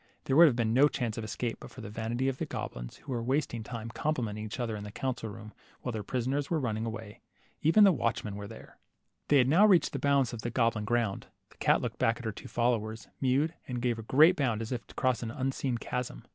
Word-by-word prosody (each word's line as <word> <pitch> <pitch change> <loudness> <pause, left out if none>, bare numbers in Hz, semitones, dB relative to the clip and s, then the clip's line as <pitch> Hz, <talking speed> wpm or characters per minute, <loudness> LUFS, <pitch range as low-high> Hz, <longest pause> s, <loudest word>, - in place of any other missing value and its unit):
There 135 - 0
would 170 +2 +9
have 130 - +2
been 115 -2 +1
no 135 +4 +6
chance 120 -6 -2
of - - -4
escape 115 +2 -3
but - - -10
for 130 - -11
the 110 - -7
vanity 115 +4 -2
of 135 -1 -1
the - - -2
goblins, - - -6
who - - -10
were 120 -2 -1
wasting 130 -1 -1
time 115 0 -6
complimenting 115 -6 -2
each 110 +4 -6
other 115 -3 -2
in 105 - -6
the 105 - -7
council 125 -1 -3
room 105 +1 -10 0.3
while 125 - -3
their 110 -2 -3
prisoners 130 +5 -2
were 165 - +1
running 115 -4 -2
away. 110 -2 -7 0.4
Even 165 +8 +6
the 200 - +8
watchmen 115 - -1
were 100 0 -6
there. 110 - -13 0.5
They 145 - +5
had 125 -2 +5
now 180 +10 +6
reached 185 -5 +4
the 140 - -2
bounds 140 -3 +2
of 115 - -5
the 120 - -3
goblin 115 -3 +1
42 - - -5
LITTLE 115 -4 +2
HANS. - - -7
ground. - - -29 0.2
The - - -21
cat - - +3
looked - - -4
back 115 +1 +2
at 120 - -9
her 110 - -1
two 100 - -10
followers, 115 -2 -1
mewed, 140 +5 +2
and 125 -1 -3
gave 120 -1 0
a - - -4
great 155 +10 +5
bound 120 -7 0
as 115 - -7
if 125 -2 -2
across 130 -2 0
an 115 - -3
unseen 130 -1 -2
chasm. 120 - -4
120 Hz, 255 wpm, -30 LUFS, 110-135 Hz, 0.5 s, would